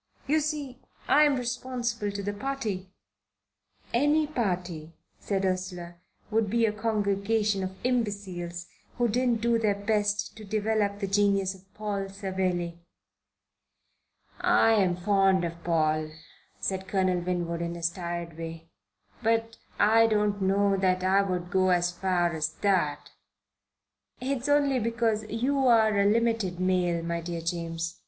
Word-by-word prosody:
You 310 +3 +2
see, 290 -4 -3 0.3
I'm 295 -1 +5
responsible 240 -3 -2
to 200 0 -5
the 205 +1 -2
party." 210 -5 -4 1.0
"Any 295 +5 +3
party," 180 - -3 0.3
said 195 -1 -1
Ursula, 180 -2 -3 0.3
"would 220 -1 +1
be 230 +2 +2
a 215 - +1
congregation 210 -1 0
of 190 0 -5
imbeciles 200 -8 -2 0.3
who 240 -1 +2
didn't 240 0 +1
do 235 0 +2
their 210 -3 +2
best 205 0 0
to 220 - -9
develop 210 0 0
the 205 - -2
genius 195 -1 +2
of 190 0 -19
Paul 200 -2 -3
Savelli." 185 -3 -2 1.6
"I'm 200 -6 +4
fond 190 -1 +2
of 170 0 -6
Paul," 155 -2 +1 0.5
said 190 0 -3
Colonel 185 -2 +1
Winwood, 175 -1 -2
in 170 0 -3
his 170 0 0
tired 170 -2 -5
way, 165 0 -7 0.5
"but 225 0 0 0.2
I 225 +2 +5
don't 210 -2 +1
know 195 +1 +2
that 185 -1 +1
I 190 +1 +4
would 180 -2 -3
go 185 -1 +3
as 175 -1 +2
far 175 -1 0
as 155 -1 -1
that." 180 -8 +1 1.1
"It's 270 +1 -2
only 285 -2 +3
because 230 -1 0
you're 230 -3 +3
a 200 - +4
limited 225 -4 +1
male, 180 -2 +1
my 170 0 -2
dear 170 0 -4
James. 165 0 -3
200 Hz, 130 wpm, -28 LUFS, 175-225 Hz, 1.6 s, I'm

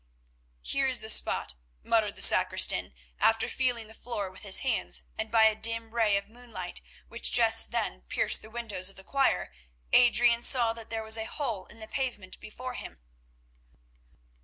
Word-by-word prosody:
"Here 275 -1 0
is 255 -3 +1
the 220 0 +2
spot," - - +2 0.3
muttered - - 0
the - - +1
sacristan, 65 - +4 0.2
after 225 0 +2
feeling 245 -4 -1
the 220 - -13
floor 215 -5 -6
with 185 - -15
his 200 -3 0
hands, 245 -4 -1
and 220 0 -5
by 225 0 +4
a 220 0 +5
dim 230 +1 -2
ray 220 -4 +2
of 200 - -6
moonlight 220 - -9 0.3
which - - -3
just - - +6
then - - -3
pierced - - 0
the 220 - -13
windows 220 -5 -2
of 195 - -12
the 190 - -9
choir, 230 - -1 0.4
Adrian 240 -1 +4
saw 240 -2 +3
that 230 -1 -10
there 225 -1 -4
was 220 +1 +2
a 220 - -4
hole 225 -8 -5
in 225 - -13
the 220 - -10
pavement 225 -9 -5
before 250 +4 -9
him. - - -9
225 Hz, 175 wpm, -28 LUFS, 210-240 Hz, 0.4 s, just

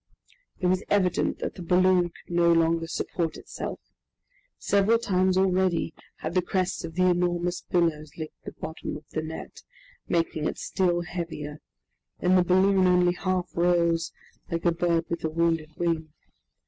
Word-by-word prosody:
It 185 - -2
was 185 +2 +2
evident 185 -4 +2
that - - -2
the - - -10
balloon 180 +1 +4
could 175 0 -10
no 170 0 +5
longer 165 0 +2
support 165 -1 -2
itself! - - -6 0.8
Several 200 +3 +3
times 185 -4 +1
already 185 -3 +2 0.3
had - - -3
the 185 - +3
crests 185 +1 -1
of 165 -1 -7
the 185 0 +3
enormous 175 0 +1
billows 160 -4 -1
licked 155 -1 -8
the - - -8
bottom 155 -1 -6
of 150 - -15
the 155 - -2
net, 160 +1 -8 0.5
making 165 -2 0
it - - -3
still 175 -2 0
heavier, 165 -4 -5 0.6
and 180 +1 +3
the 180 - +5
balloon 185 +1 +4
only 180 -1 +4
half 185 0 -2
rose, 170 -1 +2 0.4
like 170 +1 -3
a 170 - +5
bird 170 -1 +1
with 170 - -4
a 160 - 0
wounded 165 -1 0
wing. 165 -3 -1
175 Hz, 160 wpm, -26 LUFS, 165-185 Hz, 0.8 s, no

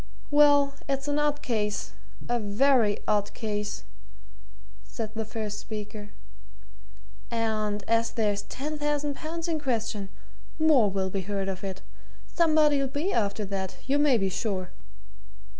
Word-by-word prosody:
"Well 290 -1 +6 0.2
it's 275 +1 -1
an 290 0 +1
odd 295 0 +1
case 210 -4 -1 0.4
a 240 0 +1
very 220 +1 +3
odd 205 -1 +1
case," 210 -2 -3 1.0
said 220 -3 -5
the 220 -1 -3
first 215 -1 -4
speaker. 210 -1 -6 1.2
"And 215 -3 -1
as 230 0 +3
there's 210 -3 0
ten 295 +8 -5
thousand 295 -1 0
pounds 330 +2 -4
in 325 -2 0
question, 225 -7 -2 0.5
more 305 -9 +5
will 190 -1 -1
be 195 - -1
heard 195 +1 -2
of 190 0 -5
it. 190 -1 -5 0.4
Somebody'll 305 -4 +3
be 295 +8 -1
after 210 -1 0
that, 190 -1 -4
you 280 +2 +2
may 290 -4 +5
be 195 -2 +1
sure!" 185 -2 -2
225 Hz, 135 wpm, -28 LUFS, 205-285 Hz, 1.2 s, Well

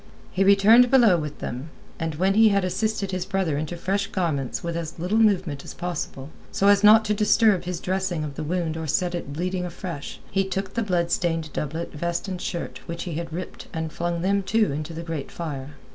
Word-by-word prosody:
He 190 - +2
returned 205 +5 +6
below 235 -8 +6
with 150 -3 -4
them, 130 +6 -5 0.3
and 160 -2 -2
when 190 +5 +2
he 220 +1 +6
had 200 -2 +2
assisted 200 +1 -1
his 185 -1 -2
brother 190 -5 -1
into 155 +4 -3
fresh 200 +3 -1
garments 160 - -2
with 170 -1 -3
as 165 -2 -5
little 180 +6 0
movement 185 -10 +2
as - - -9
possible 160 -5 -5 0.2
so 200 - +3
as 205 0 +5
not 215 +1 +8
to 210 - +1
disturb 210 -2 +3
his 180 -1 -3
dressing 185 -3 -1
of 150 -2 -5
the 140 - -5
wound 165 0 -1
or 160 -1 -4
set 175 +5 0
it 170 -5 -4
bleeding 180 +4 -2
afresh, 175 -4 -6
he 195 0 +2
took 195 0 -3
the 230 - 0
blood 175 -5 0
stained 165 -3 -1
doublet, 160 +3 -3
vest, 170 +4 -2
and 185 -2 -4
shirt 175 -3 -4
which 170 0 -4
he 175 - -5
had 165 +1 -4
ripped 180 +3 -6
and 160 -1 -3
flung 170 0 -2
them, 200 +1 +2
too, 215 +1 +1
into 155 +3 -4
the 165 +1 -6
great 165 -4 -5
fire. 145 -4 -6
175 Hz, 215 wpm, -24 LUFS, 160-195 Hz, 0.3 s, not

